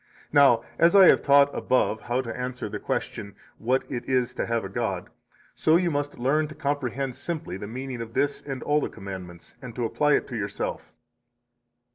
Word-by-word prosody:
Now, 140 -6 +6 0.2
as 170 +3 +5
I 195 -2 +9
have - - +5
taught 140 0 +5
above 120 -4 +1
how 120 +2 -1
to 115 -3 -6
answer 125 0 -4
the - - -5
question, 100 -2 -4 0.2
what 130 +3 +1
it 120 - -5
is 125 -1 +1
to - - -3
have 115 -2 -1
a - - -3
god, 95 - -3 0.4
so 155 - +3
you 175 0 +2
must 145 0 -2
learn 145 +5 +1
to 150 - -11
comprehend 135 -2 -2
simply 160 - -4
the 100 +2 -6
meaning 125 +1 -5
of 115 0 -7
this 145 0 +1
and 135 -2 -6
all 150 +1 +2
the - - -2
commandments, 90 -3 -9
and 125 -4 -9
to 120 - -1
apply 150 +5 +2
it - - 0
to 125 - -5
yourself. 100 -2 -4
130 Hz, 195 wpm, -26 LUFS, 115-145 Hz, 0.4 s, I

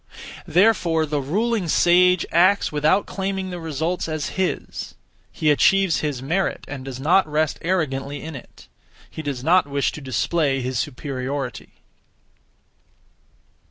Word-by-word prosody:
Therefore 175 -4 +3
the 150 -1 -2
(ruling) 205 - -1
sage 180 +2 +4
acts 185 +4 +3
without 155 +6 +2
claiming 190 -1 -3
the 180 - -5
results 165 +2 -2
as 155 -2 -3
his; 190 -1 -3 0.4
he 155 -1 +1
achieves 195 +4 +3
his 145 -4 -3
merit 180 +8 -1
and 140 -3 -7
does 130 -1 -7
not 170 +6 +3
rest 155 0 0
(arrogantly) 145 -5 -2
in 160 -1 -7
it: 130 - -13 0.4
he - - -6
does 140 -5 -4
not 180 +2 +4
wish 140 0 0
to 150 - -9
display 135 +1 0
his 130 -1 -2
superiority. 130 0 -5
155 Hz, 130 wpm, -22 LUFS, 140-180 Hz, 0.4 s, sage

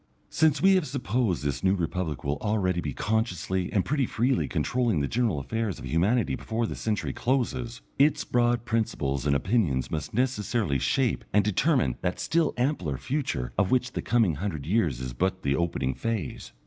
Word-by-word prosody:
Since 155 -3 +2
we 195 0 +7
have 185 -5 +2
supposed 120 - -1
this 70 -1 -2
New 95 +1 +4
Republic 85 -3 -3
will 70 +1 -1
already 95 -5 0
be 75 - -3
consciously 95 - -1
and 100 - +1
pretty 140 -3 +1
freely 125 +3 +1
controlling 120 -8 0
the 70 - 0
general 115 - 0
affairs 110 +7 -2
of - - -8
humanity 100 +9 +1
before 115 +1 -2
this - - -5
century 110 -2 -1
closes, 125 -1 -1 0.2
its 145 +2 +4
broad 120 -1 +1
principles 75 - -1
and 70 - +3
opinions 90 - +1
must 75 -3 -3
necessarily 110 - 0
shape 130 - +1
and 105 -1 +4
determine 130 - +2
that 90 0 -2
still 165 -2 +1
ampler 120 - 0
future 130 - -2
of 100 -2 +2
which 125 0 +1
the - - -3
coming 115 -8 +2
hundred 80 -6 -3
years 80 - +1
is 65 -1 -5
but 95 +7 -1
the 70 0 +1
opening 75 -6 -1
phase. 110 - -4
105 Hz, 175 wpm, -27 LUFS, 80-125 Hz, 0.2 s, we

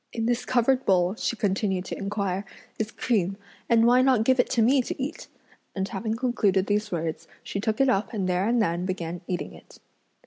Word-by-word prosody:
"In 225 -1 -2
this 245 +1 0
covered 255 +1 +2
bowl," 180 -1 +3
she 235 - -2
continued 195 -3 -1
to - - -5
inquire, 200 -1 -2 0.4
"is 220 0 -1
cream, 195 -6 -1 0.3
and 230 -1 +5
why 245 +2 +5
not 255 -4 +3
give 260 +2 +3
it 245 - +3
to 235 -3 +2
me 260 +4 +4
to 245 - -5
eat?" 280 +5 -5 0.5
and 190 -1 -1
having 215 +3 -3
concluded 215 -6 +1
these 210 +1 -1
words, 165 -2 -3 0.2
she 200 - -4
took 215 +1 -1
it 270 - +4
up 205 -5 +1
and 200 -5 -2
there 180 +2 +1
and 240 +1 +2
then 180 -3 0
began 175 -2 -4
eating 180 -1 -3
it. - - -16
210 Hz, 205 wpm, -26 LUFS, 190-240 Hz, 0.5 s, and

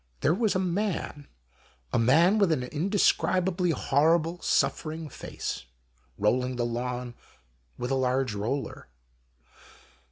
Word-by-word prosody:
There 155 - +3
was 210 +1 +1
a - - +2
man, 180 -5 -2 0.7
a - - +3
man 165 - +4
with 195 -5 +3
an 140 -5 +1
indescrib 185 +4 +1
ably 180 -1 0
horrible 165 +3 +2
suffering 155 0 0
face, - - -6 0.5
rolling 125 +5 +1
the 120 -1 -1
lawn 125 +1 -3 0.6
with 125 - -3
a - - +2
large 130 -2 +1
roller. 115 +7 -3
150 Hz, 120 wpm, -27 LUFS, 125-175 Hz, 0.7 s, man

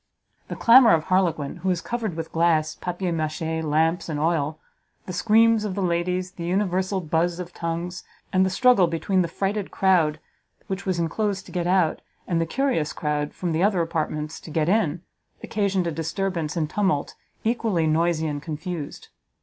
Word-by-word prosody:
The - - -5
clamour 235 0 +7
of 155 - -1
Harlequin, 175 -6 0
who 185 +2 -2
was 180 -2 +1
covered 220 -4 -3
with 160 0 -5
glass, 160 -2 +2
papier 180 0 -3
machee, 160 0 -2
lamps 160 +3 +1
and 150 -2 -2
oil, 155 -1 0 0.5
the 185 - -6
screams 225 +2 +4
of 200 -3 -3
the 200 - -1
ladies, 180 +1 -1
the 170 - -8
universal 190 +1 0
buz 170 +1 0
of 175 -1 -7
tongues, 170 +2 -4 0.3
and 185 0 +4
the 190 - +2
struggle 220 -2 +4
between 185 +3 0
the 170 - 0
frighted 195 +3 -2
crowd 170 -6 +2 0.5
which 195 0 -5
was 185 -2 0
enclosed 200 +4 -1
to - - -12
get 175 -1 -1
out, 180 -3 +2 0.3
and 170 -2 +1
the 165 - -1
curious 245 - 0
crowd 150 -1 -2
from 175 -2 -2
the 160 +1 0
other 195 -1 +3
apartments 155 -1 -3
to - - -11
get 155 0 0
in, 180 -4 +1 0.4
occasioned 200 -3 0
a 170 - -1
disturbance 165 0 -2
and 155 -2 -1
tumult 190 -9 0 0.3
equally 220 -7 +1
noisy 160 +1 +1
and 145 -2 -3
confused. 160 0 -6
175 Hz, 175 wpm, -24 LUFS, 160-190 Hz, 0.5 s, clamour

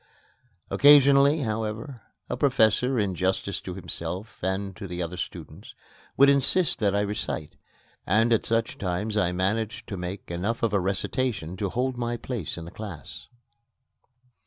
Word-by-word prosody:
Occasionally, 140 +1 +6
however, 110 +2 -3 0.3
a - - -2
professor, 125 -2 +3
in 100 -3 0
justice 95 +3 -1
to 90 - -6
himself 95 +2 -6
and 95 +1 -2
to 100 -3 -6
the 90 -1 -6
other 90 0 -3
students, - - -8 0.4
would 140 - +7
insist 140 +4 +3
that 100 -2 +2
I 100 - +2
recite, 100 -7 -3 0.5
and 115 +5 +3
at 115 - +2
such 115 0 0
times 100 +3 -2
I 90 -4 +2
managed 100 +5 -1
to 100 - -4
make 90 +1 -6
enough 100 +8 -2
of 115 -3 +1
a 100 - +3
recitation 95 -1 -2
to 100 -1 -1
hold 125 +4 -1
my 120 0 -2
place 115 - -5
in 85 - -7
the 85 - -9
class. 95 - -9
105 Hz, 155 wpm, -26 LUFS, 95-120 Hz, 0.5 s, would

